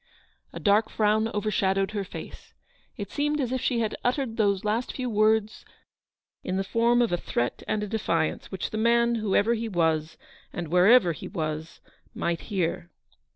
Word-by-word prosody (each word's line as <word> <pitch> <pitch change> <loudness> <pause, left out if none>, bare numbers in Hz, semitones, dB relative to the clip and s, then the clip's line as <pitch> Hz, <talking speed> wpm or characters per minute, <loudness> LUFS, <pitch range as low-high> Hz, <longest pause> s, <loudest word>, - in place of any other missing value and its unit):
A - - -7
dark 210 +1 +3
frown 215 +1 +2
overshadowed 195 -2 0
her 205 -2 -2
face. 195 - -10 0.4
It - - -6
seemed 295 +1 0
as 255 -3 -1
if 260 -1 -1
she 235 -2 0
had 220 - -1
uttered 245 -2 0
those 200 -4 +1
last 220 +4 0
few 250 -2 -3
words 215 0 +2 0.8
236 - - -7
in 185 - 0
the 195 - 0
form 235 +4 +2
of 230 - -1
a 175 - +1
threat 120 -7 -2
and 210 -1 -1
a - - -3
defiance, 170 -7 -1
which 190 -3 -4
the 215 - -3
man, 235 +1 +3
whoever 220 0 +2
he 230 0 -3
was, 160 -4 0 0.3
and 170 -3 -5
wherever 180 +3 +5
he 155 - -7
was, 160 -3 -5 0.3
might 170 -1 -1
hear. 175 -3 -2
210 Hz, 175 wpm, -26 LUFS, 180-230 Hz, 0.8 s, wherever